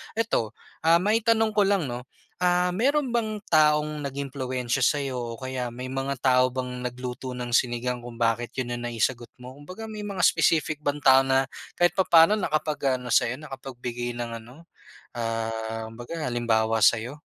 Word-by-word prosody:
eto, 220 - -1 0.2
ah, 165 +1 +4
maitanong 220 +3 +2
ko 205 -2 +3
lang 195 -8 +1
'no, 120 +1 -5 0.4
ah, 180 0 +2
meron 280 +5 +2
bang 215 -2 -1
taong 150 -1 +3
nag-impluwensiya 130 -2 -2
sa'yo 140 -2 +1
o 120 0 -5
kaya 130 -2 -4
may 125 +2 -7
mga 135 0 -3
tao 125 -1 +3
bang 125 -1 -4
nagluto 125 +1 -5
ng 125 -1 -2
sinigang 120 0 0
kung 120 -1 -10
bakit 115 +1 0
yun 125 - -2
ang 120 - -6
naisagot 120 +1 -2
mo? 125 +1 -10
Kumbaga 185 +10 -9
may 215 -1 -7
mga 200 -3 -5
specific 155 -3 +2
bang 145 +1 -1
tao 135 0 +6
na 135 0 +2 0.3
kahit 175 0 +3
papa'no 180 +1 +5
nakapag-ano 150 -8 -1
sa'yo, 125 +2 +2
nakapagbigay 125 -4 -6
ng 120 -1 -3
ano, 145 +9 -16 0.5
ah, 115 -1 -3
kumbaga 120 +8 -7
halimbawa 115 -2 +1
sa'yo? 115 +2 +3
130 Hz, 155 wpm, -26 LUFS, 120-160 Hz, 0.5 s, tao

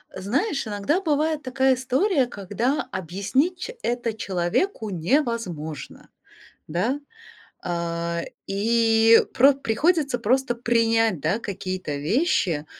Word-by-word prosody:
Знаешь, 275 - -1
иногда 210 - 0
бывает 310 -2 0
такая 265 0 +2
история, 260 - +1
когда 225 +6 -2
объяснить 200 - -1
ч 485 +5 -6
это 240 -1 -1
человеку 210 - -1
невозможно, 180 - -2 0.6
да. 210 - -1 0.6
А, 170 -1 -2 0.2
и 225 +2 +4
про 270 +2 +6
приходится 275 +3 +1
просто 245 +2 +1
принять, 225 - +2
да, 165 +9 0
какие-то 185 -7 -4
вещи, 165 - 0
230 Hz, 100 wpm, -24 LUFS, 185-270 Hz, 0.6 s, про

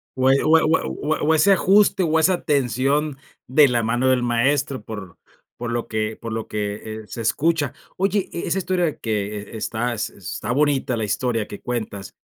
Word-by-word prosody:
O 130 0 +3
e 135 - +3
o 160 +1 +6
e - - +3
o - - +2
e - - -5
o 155 +1 -2
e - - -12
o 160 - +5
ese 195 +6 +4
ajuste, 195 0 +4
o 160 -1 +2
esa 175 +2 +2
tensión 140 +1 +1 0.3
de 145 +2 +6
la 120 -3 +1
mano 120 +3 +1
del 125 -1 +2
maestro, 130 +1 +1
por 105 -6 -8 0.4
por 120 0 -4
lo 120 0 -2
que 110 0 -2
por 115 -1 -7
lo 110 0 -4
que, 105 -1 -3 0.3
eh, - - -18
se 115 - -6
escucha. 150 +6 +1 0.2
Oye, 195 +1 0
e 170 - -4
esa 175 - 0
historia 180 -4 0
que, 105 -2 -2
e - - -5
está 120 +2 -2
s 110 - -4
está 100 +4 -5
bonita, 140 -1 +1
la 110 - -2
historia 115 +1 -1
que 105 - -9
cuentas. 110 -6 -4
125 Hz, 210 wpm, -22 LUFS, 110-155 Hz, 0.4 s, o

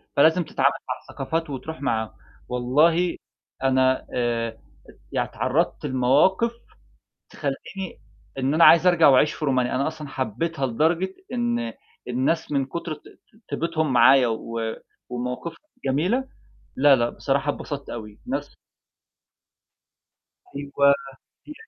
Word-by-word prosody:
فى - - +4
لازم 165 +2 +4
تتعامل 140 -2 +2 0.2
مع 125 - 0
الثقافات 160 +4 -3
وتروح 145 +3 -6
مع 110 -5 -1 0.4
والله 155 +8 +2 0.5
أنا 130 0 +2
آآ، 115 -2 -1 0.6
يعني - - 0
تعرضت - - -1
لمواقف 140 - +3 0.8
تخلّيني 180 +7 -5 0.4
إن 135 +3 +1
أنا 165 - +6
عايز 170 +2 +7
أرجع 175 -3 +6
وأعيش 140 +3 +5
في 155 - -5
رومانيا. 130 -3 +1
أنا 135 +2 +1
أصلًا 155 -2 -5
حبيتها 135 +4 -2
لدرجة 165 +9 0 0.2
إن 240 0 -1 0.4
الناس 130 +7 0
من 135 -2 +1
كتر 170 +3 -5
ط 150 - -19 0.5
طِيبتهُم 160 -4 -1
معايا 130 0 +6
و 115 0 -4 0.5
ومواقفهم 125 +7 -4 0.3
جميلة، 185 - +1 0.5
لا 140 0 +6
لأ 120 -1 +1
بصراحة 140 +1 -1
اتبسطت 140 -2 -7
أوي. 105 -3 -8
ناس - - -4 2.0
أيوه. 140 0 +1
هي 140 - +7 0.5
دي 300 - -9
140 Hz, 120 wpm, -24 LUFS, 130-165 Hz, 2.0 s, عايز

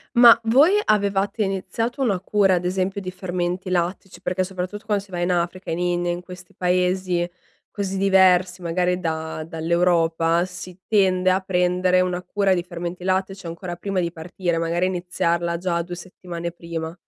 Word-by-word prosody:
Ma 240 -1 +9
voi 275 - +5
avevate 200 +1 +1
iniziato 195 +6 -3
una 205 -8 +1
cura, 195 0 +3
ad 180 - -2
esempio 190 +2 -1
di 185 -2 -5
fermenti 180 0 -3
lattici, 180 +2 -2
perché 185 +1 0
soprattutto 185 +3 -5
quando 210 -2 0
si 200 - -17
va 180 -2 -4
in 175 +1 +1
Africa, 175 +1 -2
in 165 - -2
India 175 0 0
in 175 - -4
questi 180 0 -12
paesi 180 0 +1 0.5
così 195 -1 -3
diversi 185 -2 +4
magari 180 +1 0
da 160 -2 -3
dall'Europa 165 0 +1
si 180 0 -8
tende 185 -3 +3
a 185 - +2
prendere 180 -1 +2
una 180 0 -1
cura 200 0 +1
di 175 - 0
fermenti 175 0 -6
lattici 190 0 -1
ancora 175 +1 -6
prima 195 +1 -1
di 170 -1 -2
partire, 170 +1 -3
magari 170 +2 0
iniziarla 170 -1 -1
già 170 -1 -1
2 175 +1 -6
settimane 175 -1 -7
prima. 165 -1 -6
180 Hz, 165 wpm, -23 LUFS, 175-190 Hz, 0.5 s, Ma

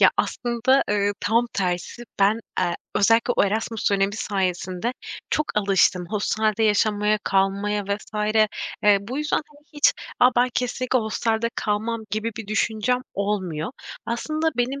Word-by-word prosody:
Ya, - - +7
aslında, 250 +3 +1
ııı, 205 0 +2
tam 230 +5 +2
tersi 185 +5 -2 0.2
ben 210 +3 +4 0.2
e 175 -1 +1 0.2
özellikle 225 +3 +3
o - - +5
Erasmus 220 +1 -1
dönemi 200 +1 +1
sayesinde 190 +2 -2 0.4
çok 305 - +1
alıştım 195 -3 +3
hostelde 215 +1 0
yaşamaya, 210 0 +2
kalmaya 200 +1 +1
vs. 210 +1 -2 0.5
Eee, 205 -1 +6
bu 240 +8 -5
yüzden, 300 +1 0
hani, 295 0 -22
hiç, 295 -1 +4 0.3
"A, 250 - +7
ben 250 +1 +4
kesinlikle 255 0 0
hostelde 225 +1 -1
kalmam." 220 +2 -1
gibi 215 +2 -1
bir 225 -3 -6
düşüncem 220 +3 0
olmuyor. 195 -4 -2 0.4
Aslında 310 +7 -1
benim 260 +3 -1
215 Hz, 140 wpm, -23 LUFS, 200-240 Hz, 0.5 s, Ya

